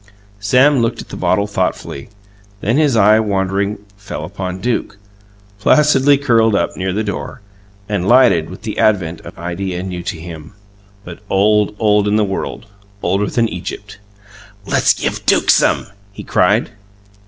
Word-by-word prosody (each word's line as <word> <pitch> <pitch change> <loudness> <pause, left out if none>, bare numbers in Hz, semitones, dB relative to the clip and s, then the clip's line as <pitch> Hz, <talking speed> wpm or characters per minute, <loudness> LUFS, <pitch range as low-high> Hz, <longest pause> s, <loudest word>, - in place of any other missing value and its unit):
Sam 125 +6 +3
looked 115 +1 -1
at - - -9
the - - -7
bottle 100 +2 +1
thoughtfully; 95 -7 -3 0.5
then 115 +6 0
his 150 -5 +2
eye, 110 0 +5
wandering, 100 -1 -1 0.2
fell 100 -6 -7
upon 95 0 -5
Duke, 110 -2 -2 0.6
placidly 145 +3 +4
curled 115 -6 +2
up - - -1
near 95 0 -2
the 105 +4 -1
door, 105 +3 -5 0.5
and 100 -3 -2
lighted 120 -10 +4
with 95 +3 -11
the 110 -2 -4
advent 90 -6 +1
of - - -12
an 85 - -10
idea 90 +1 -4
new 90 -2 -5
to 85 -1 -5
him, 80 -2 -10 0.5
but - - -10
old, 105 +1 +2
old 105 -1 +2
in 105 - +1
the 110 - +3
world 95 +3 -5 0.4
older 100 +1 0
than 115 -2 +1
Egypt! 100 +1 -7 0.7
"Let's - - +2
give - - -3
Duke - - +4
some!" - - +2 0.3
he - - -10
cried. - - +1
100 Hz, 155 wpm, -17 LUFS, 95-110 Hz, 0.7 s, eye